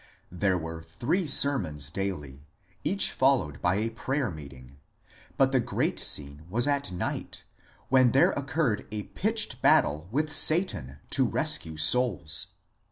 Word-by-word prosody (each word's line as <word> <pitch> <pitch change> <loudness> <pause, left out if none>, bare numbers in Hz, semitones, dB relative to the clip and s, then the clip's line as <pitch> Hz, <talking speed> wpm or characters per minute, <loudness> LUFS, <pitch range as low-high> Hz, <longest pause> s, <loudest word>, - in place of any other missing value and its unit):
There 95 +1 0
were 80 -1 -6
three 120 - -2
sermons 90 - +1
daily, 75 -7 -5 0.4
each 200 +1 +2
followed 130 - +1
by 85 +1 +2
a 110 +3 -1
prayer 130 +2 -2
meeting, 70 -4 -12 0.6
but 135 -1 +3
the 130 - +3
great 125 +1 -1
scene 70 0 -1
was 120 +7 +1
at 140 -6 0
night, 90 - -5 0.5
when 130 -2 +5
there 135 - +4
occurred 140 -5 -1
a 105 -1 -4
pitched 215 - -2
battle 75 +4 +3
with 150 +6 -1
Satan 155 - +2
to - - +2
rescue 80 -1 0
souls. 80 - +1
105 Hz, 135 wpm, -27 LUFS, -, 0.6 s, when